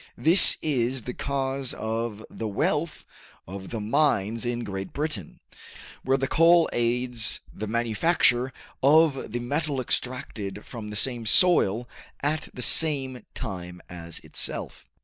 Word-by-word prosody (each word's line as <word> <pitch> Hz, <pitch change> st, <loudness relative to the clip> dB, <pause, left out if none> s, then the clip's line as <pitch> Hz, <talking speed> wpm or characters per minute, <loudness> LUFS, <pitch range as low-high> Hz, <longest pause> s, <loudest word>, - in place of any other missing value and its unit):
This 170 Hz, +4 st, +7 dB
is 130 Hz, -4 st, 0 dB
the 125 Hz, -, -5 dB
cause 135 Hz, -1 st, -3 dB
of 110 Hz, -1 st, -4 dB
the 110 Hz, -, -6 dB
wealth 150 Hz, +10 st, -1 dB, 0.4 s
of 95 Hz, +1 st, -8 dB
the 115 Hz, -, -4 dB
mines 115 Hz, -2 st, +1 dB
in 120 Hz, 0 st, -2 dB
Great 95 Hz, -2 st, -6 dB
Britain, 140 Hz, -, -4 dB, 0.6 s
where 135 Hz, +1 st, +1 dB
the 135 Hz, -, -1 dB
coal 165 Hz, +2 st, +5 dB
aids 120 Hz, -1 st, +1 dB
the 110 Hz, -, -5 dB
manufacture 120 Hz, +3 st, +1 dB, 0.3 s
of 145 Hz, -3 st, +4 dB
the 120 Hz, -, -2 dB
metal 145 Hz, +3 st, -2 dB
extracted 115 Hz, -5 st, -3 dB
from 115 Hz, -4 st, -8 dB
the 105 Hz, -, -7 dB
same 120 Hz, 0 st, -1 dB
soil 120 Hz, -, +4 dB, 0.3 s
at 155 Hz, +2 st, -1 dB
the 125 Hz, -, -4 dB
same 135 Hz, -5 st, +2 dB
time 90 Hz, -3 st, -6 dB
as 85 Hz, -2 st, -8 dB
itself. -, -, -4 dB
120 Hz, 130 wpm, -26 LUFS, 110-140 Hz, 0.6 s, This